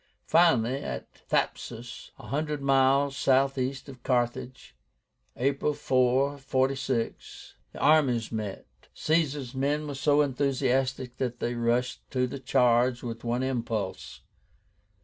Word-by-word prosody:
Finally, 135 -7 +4
at - - -6 0.2
THAPSUS, 120 0 -3
one 115 - -12
hundred 150 +2 -2
miles 135 0 +3
southeast 135 -1 +1
of 130 -3 -11
Carthage, 125 +1 -2 0.6
April 140 +3 0
4, 135 +1 +1
46, 135 -3 -2 0.2
the - - -10
armies 140 -7 +3
met. 105 -3 -4 0.3
Caesar's 145 -5 0
men 145 +3 0
were 145 - -5
so 145 +2 +3
enthusiastic 130 -2 0
that 125 -2 -3
they 120 - -1
rushed 120 +2 0
to 125 -1 0
the 125 +2 -6
charge 125 -1 +2
with 115 -2 -6
one 120 +2 -1
impulse. 115 -6 -3
130 Hz, 115 wpm, -28 LUFS, 120-140 Hz, 0.6 s, Finally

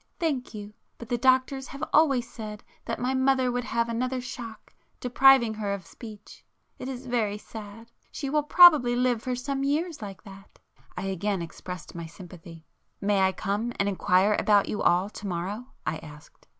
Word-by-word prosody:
"Thank 280 - -2
you. 205 0 -8 0.2
But 235 - -10
the 240 - +1
doctors 260 +1 +2
have 275 - -8
always 275 -6 +4
said 215 -3 -8 0.2
that - - -3
my 255 +2 0
mother 260 -1 +2
would 245 0 -2
have 230 0 0
another 250 +3 -1
shock 235 -3 -8 0.3
depriving 250 -2 +5
her 210 -2 -3
of 190 -3 -10
speech. 215 -1 -12 0.4
It 255 - -5
is 260 0 -6
very 225 -5 0
sad; 220 +2 -11 0.2
she 280 - -5
will 300 +2 +2
probably 295 -6 +7
live 245 -2 +1
for 255 0 -2
some 270 +2 -3
years 305 +2 -1
like 200 -2 -8
that." 195 -2 -14 0.4
I - - -3
again 195 -1 -2
expressed 180 +2 -8
my 170 -1 -6
sympathy. 165 -1 -12 0.3
"May 200 0 +1
I 190 0 +4
come 210 +5 -2
and 200 - +2
inquire 195 +1 +3
about 205 -2 +4
you 210 - -3
all 180 +3 +3
to 210 0 -8
morrow?" 195 +7 -4 0.2
I 155 +1 -1
asked. 150 -1 -14
230 Hz, 175 wpm, -27 LUFS, 200-255 Hz, 0.4 s, probably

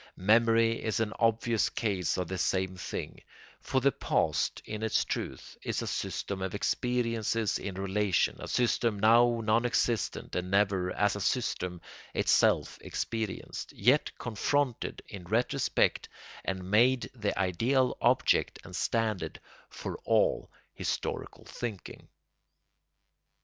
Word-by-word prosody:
Memory 115 +3 +3
is 110 -2 0
an 110 -1 -1
obvious 115 0 +2
case 95 -7 -1
of 90 -2 -2
the 95 +1 -4
same 95 +1 0
thing; 90 - -6 0.4
for 130 - 0
the 140 +2 +4
past, - - 0
in 105 0 -5
its 110 -1 +1
truth, - - -5
is - - -2
a - - -5
system 100 -1 -3
of 95 +1 -3
experiences 115 -1 0
in 100 -2 -5
relation, 100 0 +1
a - - -6
system 120 -3 +1
now 115 +3 +5
non 110 +2 +3
existent 120 -3 -1
and 90 0 -2
never, 95 -2 +2
as 105 +1 +1
a 105 - -4
system, 90 -6 -1 0.3
itself - - +3
experienced, 110 -3 -4
yet - - +3
confronted 125 +3 -1
in 95 -3 -8
retrospect 115 +7 +1 0.3
and 95 0 -4
made 125 +4 +4
the 105 -5 -2
ideal 120 +8 +2
object - - +3
and - - -9
standard 110 -4 -1 0.3
for - - -6
all - - +2 0.2
historical - - -4
thinking. 110 -6 -7
110 Hz, 125 wpm, -30 LUFS, 95-115 Hz, 0.4 s, now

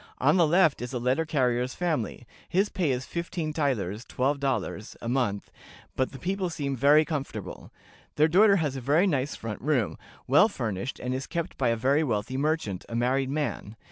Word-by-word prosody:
On - - +3
the 170 -3 +4
left 165 -4 +3
is 125 +2 -5
a - - -1
letter 130 +7 0
carrier's 125 -4 0
family. 155 - -2 0.2
His 195 +4 +2
pay 175 -6 -1
is 130 0 -1
fifteen 170 -2 -4
thalers 120 - -1
(twelve 140 +3 -1
dollars) 120 -6 -3
a - - -6
month, 120 -5 -1 0.4
but 130 - 0
the 135 - -9
people 185 +5 -2
seem 140 -4 -3
very 145 +5 +5
comfortable. 145 -2 -5 0.5
Their 155 +1 +4
daughter 200 +5 +5
has 150 -7 0
a 135 - -5
very 150 +9 +3
nice 140 -6 0
front 110 -2 -6
room, 130 -7 0 0.3
well 145 - +5
furnished, 110 - -4
and 125 +1 -3
is 130 +1 -4
kept 170 0 -3
by 125 -3 +1
a 115 - +2
very 135 +7 +2
wealthy 115 -1 -2
merchant, 140 - -1
a 115 - -4
married 130 +3 +1
man. 140 -7 -3
135 Hz, 190 wpm, -27 LUFS, 125-160 Hz, 0.5 s, very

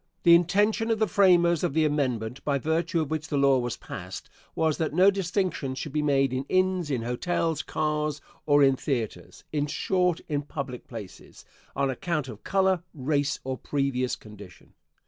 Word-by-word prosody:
The 170 - +7
intention 205 +6 +3
of 225 - +2
the 220 - +2
framers 175 -5 +4
of 140 - -1
the 160 -1 +3
amendment, 130 -5 -1
by 140 -1 +1
virtue 160 +4 0
of 155 -1 -4
which 155 0 -2
the 145 - -1
law 140 -1 +4
was 120 -1 -3
passed, 90 -1 -8 0.2
was 160 -2 +1
that 155 -2 -1
no 190 +3 +6
distinction 185 -7 -2
should 150 +2 -5
be 150 - +1
made 135 -3 +2
in 130 +1 -1
inns, 185 -3 +1
in 125 -5 -1
hotels, 155 +5 -1
cars, 150 0 -1 0.3
or 145 -1 +5
in 135 -1 +5
theatres; 125 -5 -4
in 150 -1 0
short, 180 +2 0
in 145 -2 -1
public 140 -4 -6
places, 110 -6 -10 0.3
on 135 -1 +1
account 155 -2 -2
of 110 -3 -10
color, 190 -2 +2
race, 145 +1 0
or 130 -1 -4
previous 135 -3 -1
condition. 105 -5 -14
150 Hz, 175 wpm, -27 LUFS, 130-170 Hz, 0.3 s, The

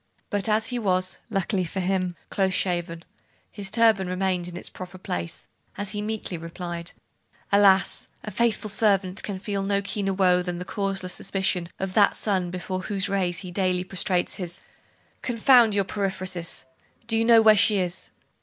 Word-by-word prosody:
But 205 0 0
as 220 +1 +1
he 245 -1 -2
was, 185 -3 0
luckily 195 -2 0
for 180 +3 -4
him, 185 -1 0 0.2
close 190 -1 +1
shaven, 170 -2 -1 0.5
his 200 -2 -4
turban 220 -3 +4
remained 185 -1 -1
in 175 0 -7
its - - -5
proper 185 0 -9
place, 85 - -4 0.3
as 200 0 -4
he 210 -1 -3
meekly 210 -5 -4
replied 170 +1 -6 0.6
'Alas! 195 -2 +4 0.2
a 215 - -6
faithful 215 0 0
servant 195 -3 +2
can 200 -2 -4
feel 200 0 -3
no 200 0 +1
keener 200 0 -2
woe 180 -2 +4
than 180 -1 -4
the 180 - -5
causeless 195 -1 -3
suspicion 190 -3 -1
of 190 -1 -3
that 205 0 +4
sun 190 -4 0
before 185 +1 -4
whose 195 0 -1
rays 185 -3 0
he 185 -2 -7
daily 180 -1 0
prostrates 185 -1 0
his 175 -2 -5 0.3
' - - -37
'Confound 235 -2 +5
your 200 -1 +2
periphrases! 185 -7 -3 0.4
Do 225 0 -1
you 225 - +3
know 230 -1 +6
where 215 -1 +8
she 205 +1 +4
is? 180 -1 -2
190 Hz, 175 wpm, -25 LUFS, 180-205 Hz, 0.6 s, where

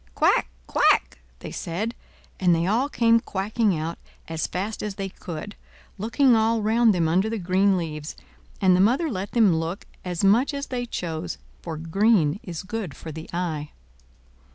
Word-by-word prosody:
"Quack! - - +3 0.2
quack!" - - +2 0.2
they - - -7
said; 205 +8 -3 0.5
and 180 -2 +4
they 165 +1 0
all 235 +9 +1
came 230 -3 +4
quacking 205 -1 0
out 160 +2 -4 0.3
as 160 -1 -2
fast 200 +4 -3
as 210 -2 -4
they 195 -1 -4
could, 180 +2 -7 0.4
looking 235 +4 +3
all 225 0 +2
round 225 +1 +4
them 170 -4 +1
under 185 +7 +2
the 225 - -2
green 190 +1 +2
leaves; 155 -3 -5 0.4
and 185 -2 +5
the 185 - +4
mother 265 - +3
let 195 -1 -4
them 215 -8 +5
look 165 +5 -3 0.2
as 180 -1 -3
much 235 +9 +4
as 280 0 -3
they 245 -1 -4
chose, 160 - -4 0.2
for 160 - -5
green 175 0 +2
is 170 -2 -6
good 190 -6 -5
for 160 - -8
the 160 +1 -8
eye. 160 -4 -3
195 Hz, 170 wpm, -25 LUFS, 165-225 Hz, 0.5 s, and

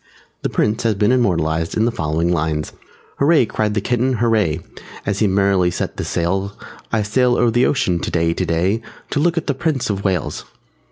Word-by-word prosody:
The - - -1
Prince 105 +2 0
has 115 -3 +1
been 105 +4 +2
immortalized 85 -9 +1
in 110 - +3
the 120 - +1
following 80 -2 -1
lines: 80 -2 -1 0.5
"Hurray!" 145 -2 +4
cried 105 -1 -1
the 105 - +1
Kitten, 125 +4 +1
"Hurray!" 110 -8 +1 0.5
As 100 -1 -1
he 110 - +3
merrily 95 -2 +2
set - - -4
the - - -2
sails, 95 +4 -1 0.4
"I 110 - +1
sail 120 +4 +2
o'er 120 -1 +3
the 120 +3 +3
ocean 95 -12 +1
today, 85 0 0
today, 90 +5 0 0.3
_To 145 - +1
look 170 +1 +2
at 165 - -1
the 140 - 0
Prince 135 -4 -1
of 100 0 -3
Wales!" 95 -6 -1
105 Hz, 185 wpm, -19 LUFS, 85-120 Hz, 0.5 s, Hurray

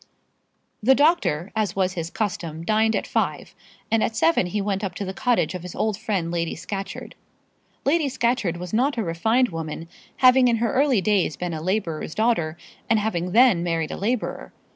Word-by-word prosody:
The 260 +5 +5
doctor, 285 - +2
as 215 -5 -1
was 190 -1 +1
his 165 -2 -4
custom, 170 -6 -3
dined 220 +3 +2
at - - -1
five, - - -2 0.4
and 225 -1 +3
at 220 - -1
seven 325 - +3
he 205 +4 -2
went 200 0 -2
up 185 -3 -3
to 200 - -4
the 190 - -4
cottage 245 0 +1
of 180 - -5
his 180 0 -8
old 215 -2 0
friend 195 -6 -2
Lady 170 -1 -2
Scatcherd. 195 +2 -6 0.7
Lady 295 0 +2
Scatcherd 235 -8 0
was 180 +2 -7
not 260 +5 +1
a 225 - 0
refined 220 +9 +1
woman, 165 0 -6 0.3
having 255 0 +6
in 235 - +3
her 230 0 0
early 270 -5 +3
days 195 -5 +1
been 180 -1 -3
a 155 - -4
labourer's 170 -4 -2
daughter 190 -8 +1 0.3
and 225 - +4
having 180 -5 -1
then 230 -4 +5
married 165 -2 -1
a - - -3
labourer. 230 +4 -3
205 Hz, 185 wpm, -23 LUFS, 175-230 Hz, 0.7 s, having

